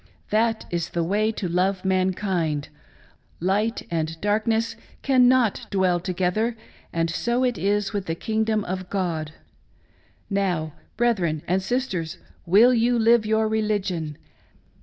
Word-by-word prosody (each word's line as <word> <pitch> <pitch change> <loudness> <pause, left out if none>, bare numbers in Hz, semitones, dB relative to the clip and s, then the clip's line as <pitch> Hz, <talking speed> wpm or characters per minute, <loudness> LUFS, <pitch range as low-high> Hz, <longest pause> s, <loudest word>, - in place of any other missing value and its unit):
That 225 +1 +1
is 170 -1 -2
the 170 - -1
way 210 +5 +1
to 200 - -3
love 185 +2 0
mankind.... 185 -5 0 0.7
Light 205 +6 0
and 160 -1 -2
darkness 220 +3 0 0.3
cannot 255 -4 +3
dwell 185 -3 +2
together, 190 +6 -1 0.3
and 165 0 0
so 235 +9 0
it 250 -2 +1
is 205 +2 0
with 200 -2 -3
the 165 - -1
kingdom 220 +2 0
of 185 0 -4
God. 165 -6 -2 0.5
" - - -36
Now, 160 -5 -1 0.2
brethren 185 -10 +1
and 185 +2 +1
sisters, 190 -7 -2 0.3
will 220 +8 +6
you 240 +1 +2
live 230 -1 +4
your 220 0 +2
religion 200 -8 -1
195 Hz, 130 wpm, -24 LUFS, 175-220 Hz, 0.7 s, will